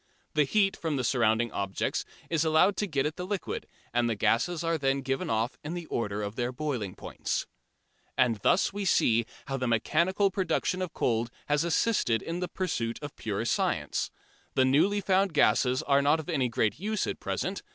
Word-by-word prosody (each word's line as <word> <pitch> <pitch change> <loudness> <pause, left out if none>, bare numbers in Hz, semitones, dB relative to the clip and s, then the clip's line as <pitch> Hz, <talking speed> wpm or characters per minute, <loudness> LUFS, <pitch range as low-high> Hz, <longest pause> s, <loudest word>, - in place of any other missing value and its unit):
The 150 -1 +3
heat 195 +4 +2
from 160 -3 -2
the 130 - -1
surrounding 120 -2 +2
objects 100 -1 -2 0.2
is 165 -2 +1
allowed 160 +5 +4
to 210 - 0
get 140 -6 0
at 155 +1 -2
the 180 - -4
liquid, 195 -1 -4 0.3
and 120 0 +2
the 115 - 0
gases 160 - +1
are 165 0 +1
then 135 0 +1
given 135 0 -2
off 115 +3 -1
in 155 +4 -4
the 175 -1 -5
order 105 -6 -2
of 100 +1 -4
their 120 0 -1
boiling 125 -8 -3
points. - - -3 0.7
And 120 -3 +3
thus 175 - +2
we 205 0 -3
see 115 - +3 0.2
how 135 0 -2
the 125 -1 -1
mechanical 170 - +2
production 185 -1 0
of 180 -3 -3
cold 115 -1 0 0.2
has 145 +1 +1
assisted 170 - +1
in 170 +1 -3
the 180 - -2
pursuit 160 -11 -2
of 145 - -6
pure - - -3
science. - - 0 0.5
The 130 - +4
newly 175 +10 +3
found 190 -2 +2
gases 125 +1 +3
are 140 -1 +3
not 145 +3 +3
of 160 - -7
any 135 -7 +1
great 110 +2 0
use 215 +2 -1
at - - -4
present. 190 +1 -3
145 Hz, 195 wpm, -29 LUFS, 120-180 Hz, 0.7 s, allowed